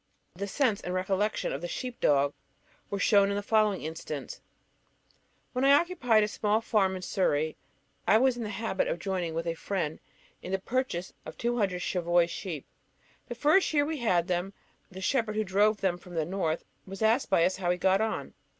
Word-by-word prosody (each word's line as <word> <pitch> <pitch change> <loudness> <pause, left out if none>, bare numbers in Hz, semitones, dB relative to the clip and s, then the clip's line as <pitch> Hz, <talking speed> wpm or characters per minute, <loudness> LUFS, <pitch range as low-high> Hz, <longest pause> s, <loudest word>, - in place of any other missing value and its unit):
The 200 +3 -5
sense 225 -1 +1
and 180 +1 -4
recollection 190 +3 0
of - - -4
the 175 - -3
sheep 250 +6 -5
dog 140 0 +3 0.6
were 200 - -2
shown 200 0 +4
in 200 - -1
the 205 - -2
following 215 -2 +2
instance: 155 -3 -6 1.1
When 255 +1 -1
I 275 +1 +6
occupied 285 -9 +3
a - - +1
small 210 0 +1
farm 200 -4 +1
in 185 - -6
Surrey, 155 -5 0 0.5
I 220 - +6
was 255 +1 +3
in 245 - -6
the 215 - -3
habit 220 -2 -1
of - - -1
joining 175 -2 -3
with 165 +1 -2
a 165 - -1
friend 165 -2 -3 0.4
in 185 - -7
the - - +3
purchase 195 -4 -2
of 155 - -9
two 240 +1 -1
hundred 180 -4 0
Cheviot 175 -1 +2
sheep. 165 -8 -5 0.6
The 240 - -5
first 305 +9 +3
year 290 -1 +4
we 315 +1 -3
had 180 -7 +2
them, 180 +2 -1 0.4
the 190 0 -9
shepherd 225 0 0
who 215 - +1
drove 205 +2 +2
them 180 -2 0
from 175 -1 -12
the 160 -2 0
North 170 -2 -2 0.2
was 195 +3 -5
asked 225 +5 +3
by 170 -4 +4
us 185 - 0
how 180 -2 -1
he 180 - +3
had 180 - -15
got 190 +1 +3
on. 220 0 -2
195 Hz, 205 wpm, -29 LUFS, 175-220 Hz, 1.1 s, I